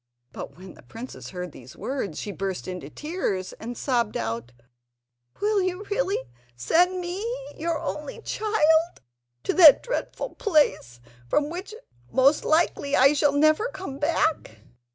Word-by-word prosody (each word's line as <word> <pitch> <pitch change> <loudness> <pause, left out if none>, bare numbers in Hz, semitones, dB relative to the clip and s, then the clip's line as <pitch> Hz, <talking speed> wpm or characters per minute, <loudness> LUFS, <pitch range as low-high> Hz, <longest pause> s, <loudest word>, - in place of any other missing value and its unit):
But - - -8
when 185 +1 -11
the - - -16
princess 230 - -9
heard 180 -2 -6
these 130 -2 -13
words, 210 - -4
she 205 - -4
burst 195 -2 -4
into 180 -6 -6
tears, 205 - -3
and 240 +2 -6
sobbed 240 -5 0
out: 115 +1 -4 0.9
"Will 415 -1 +2
you 370 +1 -2
really 410 -2 +1 0.4
send 355 - +2
me, 360 +3 -4 0.3
your 330 +1 -1
only 300 - -5
child, 335 -6 +2 0.4
to - - 0
that 320 -6 +8
dreadful - - -3
place, 290 - +1 0.3
from 295 - +1
which 375 +5 -6 0.3
most 270 +4 +4
likely 310 -3 +2
I 275 +3 +6
shall 290 -1 +2
never 310 +9 +3
come 375 - -7
back?" 295 - 0
295 Hz, 140 wpm, -25 LUFS, -, 0.9 s, that